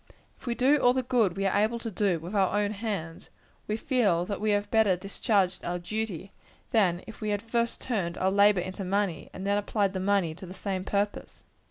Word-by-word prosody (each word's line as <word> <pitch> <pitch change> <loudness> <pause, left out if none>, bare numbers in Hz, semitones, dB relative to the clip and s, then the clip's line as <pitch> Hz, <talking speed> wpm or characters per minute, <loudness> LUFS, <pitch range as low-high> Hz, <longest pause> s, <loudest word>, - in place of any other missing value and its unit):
If - - -15
we 235 - 0
do 270 +4 +4
all 245 -1 +4
the 260 0 0
good 235 -8 +1
we 195 - -1
are 195 - +1
able 220 +2 +1
to 230 -1 -5
do, 195 -2 +1
with 170 +5 -8
our 195 0 +2
own 205 0 0
hands, 200 -7 -5 0.4
we 215 - -1
feel 210 -10 +1
that 200 +1 -4
we 215 - +1
have 205 0 0
better 220 -4 +4
discharged 190 0 0
our 175 +1 -2
duty, 195 0 -4 0.4
than 185 -6 +2
if 220 - -11
we 215 - -2
had 205 0 0
first 235 +1 -1
turned 190 -8 -2
our 190 +1 +1
labor 200 -1 +5
into 185 +2 -5
money, 190 -4 -1
and 190 - -7
then 200 +1 +2
applied 205 -1 0
the 190 - -2
money 190 -4 +1
to 185 +3 -10
the 185 - -9
same 190 -2 -3
purpose. 205 +1 -2
200 Hz, 220 wpm, -28 LUFS, 185-220 Hz, 0.4 s, labor